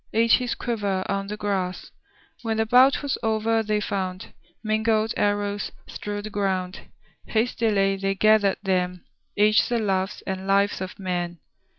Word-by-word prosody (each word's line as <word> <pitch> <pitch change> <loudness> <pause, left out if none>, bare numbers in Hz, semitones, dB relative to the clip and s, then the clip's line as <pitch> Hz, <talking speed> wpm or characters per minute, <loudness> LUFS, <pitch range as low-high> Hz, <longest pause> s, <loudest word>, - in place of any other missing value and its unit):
— - - -36
Each 230 - +5
his 250 -2 -2
quiver 205 -6 -2
on 195 0 -2
the 210 +1 -5
grass. 190 -3 -3 0.5
When 225 -2 -2
the 220 - +2
bout 255 +5 +5
was 285 - -1
o'er 225 0 +1
they 210 -1 0
found 190 -2 -4 0.3
Mingled 220 0 +1
arrows 205 0 0 0.2
strewed 205 0 -5
the 215 - -7
ground. 190 -2 -1 0.5
Hastily 220 -4 +1
they 195 0 -1
gathered 215 -1 +4
then 180 -2 -1 0.3
Each 210 +1 +4
the 240 - +1
loves 195 -2 -1
and 190 0 -4
lives 200 0 +2
of 185 +1 -6
men. 175 -3 -3
205 Hz, 155 wpm, -24 LUFS, 190-220 Hz, 0.5 s, Each